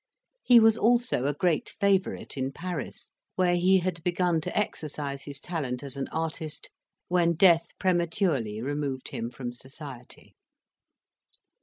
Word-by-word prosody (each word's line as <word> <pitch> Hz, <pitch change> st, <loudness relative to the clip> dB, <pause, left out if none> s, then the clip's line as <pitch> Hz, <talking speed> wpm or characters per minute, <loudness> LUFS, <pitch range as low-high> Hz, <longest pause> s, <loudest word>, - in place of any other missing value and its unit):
He 245 Hz, -2 st, +7 dB
was 225 Hz, 0 st, +5 dB
also 235 Hz, -, +2 dB
a 145 Hz, -, +1 dB
great 170 Hz, 0 st, +1 dB
favourite 200 Hz, -2 st, +1 dB
in 135 Hz, 0 st, -2 dB
Paris, 175 Hz, +4 st, -6 dB, 0.2 s
where 180 Hz, -1 st, +3 dB
he 185 Hz, +2 st, +4 dB
had 170 Hz, -2 st, -3 dB
begun 175 Hz, -1 st, +1 dB
to -, -, -4 dB
exercise 145 Hz, -8 st, -3 dB
his 140 Hz, -1 st, -6 dB
talent 140 Hz, -7 st, -4 dB
as 140 Hz, -1 st, -5 dB
an 135 Hz, -, -3 dB
artist, 160 Hz, -1 st, -4 dB, 0.4 s
when 175 Hz, -1 st, +3 dB
death 170 Hz, -1 st, +4 dB
prematurely 165 Hz, -, 0 dB
removed 140 Hz, -1 st, -3 dB
him 115 Hz, -, -4 dB
from 120 Hz, -1 st, -6 dB
society. 130 Hz, 0 st, -10 dB
160 Hz, 135 wpm, -27 LUFS, 140-180 Hz, 0.4 s, He